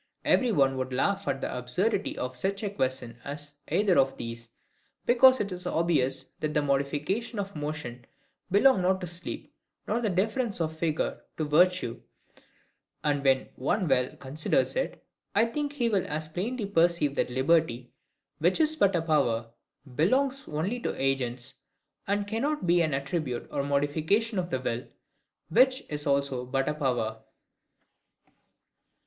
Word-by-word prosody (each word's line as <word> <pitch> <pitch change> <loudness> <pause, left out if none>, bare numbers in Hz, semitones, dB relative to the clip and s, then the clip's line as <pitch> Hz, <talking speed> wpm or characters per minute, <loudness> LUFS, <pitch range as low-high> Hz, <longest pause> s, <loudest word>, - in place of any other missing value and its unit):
Every 250 -2 +3
one 135 -7 +3
would 130 0 -3
laugh 195 +10 0
at 135 -1 -1
the - - -3
absurdity 180 - -1
of 125 0 -3
such 195 - -2
a 205 - -1
question 130 - -2
as 145 0 -7
either 200 -6 +3
of 135 0 +2
these: 115 0 -6 0.6
because 255 +2 +6
it 200 -1 -2
is 180 0 -5
obvious 150 -7 +1 0.2
that 155 -1 -2
the 150 - +4
modifications 145 - -1
of 200 -1 -4
motion 145 -5 -5 0.4
belong 205 +2 +5
not 190 +1 +2
to - - -3
sleep, 175 +1 -5 0.3
nor 230 +3 0
the 220 - +1
difference 215 +4 0
of 160 -1 -1
figure 160 -1 -1 0.2
to 155 - -1
virtue; 165 -4 +2 1.0
and 145 -2 +1
when 135 -1 +5
any - - -16
one 180 +8 0
well 125 -2 +1
considers 140 +4 0
it, - - -3 0.3
I 225 - +5
think 290 +5 -3
he 250 -5 0
will 205 -5 +1
as 155 +1 -3
plainly 210 +8 -3
perceive 170 -6 +2
that - - 0
liberty, 130 -2 +1 0.5
which 175 +4 +2
is 315 0 +3
but 200 -9 +3
a 165 - +1
power, 120 -8 +1 0.4
belongs 265 - +2
only 180 +11 -2
to - - -3
Agents, 130 -2 -1 0.5
and 200 +1 0
cannot 265 +8 -1
be 175 0 +4
an 155 -4 +1
attribute 140 -2 -3
or - - 0
modification 155 +10 +1
of 175 -1 -2
the 130 - -1
will, 120 -1 -3 0.6
which 260 0 +4
is 150 0 -4
also 140 -2 +1
but 135 +2 -1
a 150 - +1
power. 120 -7 -1
155 Hz, 155 wpm, -28 LUFS, 135-200 Hz, 1.0 s, because